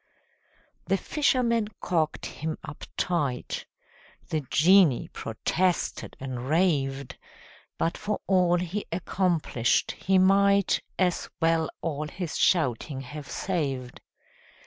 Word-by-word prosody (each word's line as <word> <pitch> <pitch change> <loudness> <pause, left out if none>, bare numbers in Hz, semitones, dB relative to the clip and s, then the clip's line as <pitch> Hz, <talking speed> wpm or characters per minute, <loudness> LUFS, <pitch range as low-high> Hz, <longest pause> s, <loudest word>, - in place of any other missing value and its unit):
The - - +2
fisherman 240 -7 +1
corked 160 -4 -1
him 155 +1 -4
up 140 - -8
tight: 145 -8 -1 0.6
The 155 - 0
genie 170 -3 +5
protested 175 +10 -1
and 130 -1 -5
raved, 140 -6 +1 0.6
But 165 - 0
for 210 0 -2
all 180 -2 +3
he 180 +4 -3
accomplished, 170 -8 +1
he 190 +1 +1
might 200 +1 +4 0.2
As 180 -2 0
well 165 -1 +2
all 150 -2 -2
his 175 +1 -5
shouting 135 -4 +1
have 145 +2 -8
saved. 135 -9 -3
165 Hz, 100 wpm, -27 LUFS, 140-185 Hz, 0.6 s, genie